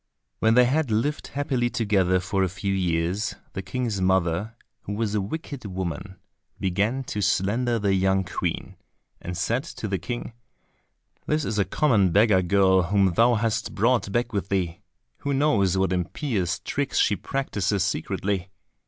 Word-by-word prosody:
When 110 0 +3
they 125 0 +7
had 145 +2 +1
lived 120 +8 0
happily 135 -4 -1
together 95 -6 +2
for 95 +2 -1
a 95 - +1
few 95 +2 -2
years, 90 +3 0 0.2
the 95 - -3
King's 105 +1 -2
mother, 95 +3 +1 0.3
who 100 - -5
was 105 0 -1
a 105 - +1
wicked 140 +4 -6
woman, 95 0 -4 0.4
began 100 +8 0
to 105 -4 -4
slander 115 +6 +1
the 100 -3 +1
young 95 0 +2
Queen, - - -4 0.4
and 90 0 -5
said 115 +7 0
to 125 -9 -6
the 95 -2 -1
King, 120 +5 -5 0.9
"This 150 -1 +1
is 105 -2 -1
a 100 - +3
common 110 - +2
beggar 100 0 +5
girl 95 0 +4
whom 95 0 +2
thou 120 +5 +4
hast 110 0 -1
brought 115 -1 +2
back 120 +2 -1
with 100 -2 -2
thee. 90 -4 -1 0.4
Who 140 -1 -1
knows 100 - +2
what 95 -1 +1
impious 90 - -1
tricks - - -3
she - - +3
practises 100 -8 -1
secretly! 95 +1 -2
100 Hz, 160 wpm, -25 LUFS, 95-120 Hz, 0.9 s, they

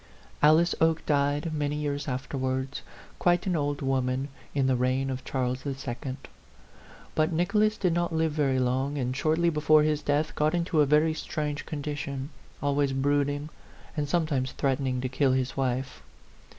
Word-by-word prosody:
Alice 160 +3 +5
Oke 160 0 +2
died 145 +2 +1
many 145 -1 -1
years 145 -1 -2
afterwards, 130 0 -2 0.4
quite 175 0 +2
an 185 -2 0
old 145 -2 -1
woman, 135 +1 0 0.3
in 135 -2 +2
the 130 -1 +3
reign 130 +2 0
of 130 0 -5
Charles 130 -1 -2
II.; 135 -1 -4 1.0
but 155 +2 +2
Nicholas 210 +6 +2
did 180 -3 +1
not 175 0 0
live 160 -1 +1
very 140 -3 +1
long, 130 +3 0
and 130 -1 -1
shortly 160 +4 +2
before 155 0 +4
his 150 -1 +1
death 145 +2 0
got 155 +3 +1
into 170 -2 +2
a 145 - +4
very 155 +2 +4
strange 150 -1 -4
condition, 145 -2 -4 0.3
always 140 -1 +1
brooding, 145 +2 0 0.5
and 145 -2 -2
sometimes 145 -6 0
threatening 130 -2 0
to 130 - -1
kill 130 +1 +2
his 130 0 -1
wife. 130 0 -2
145 Hz, 155 wpm, -28 LUFS, 130-155 Hz, 1.0 s, Alice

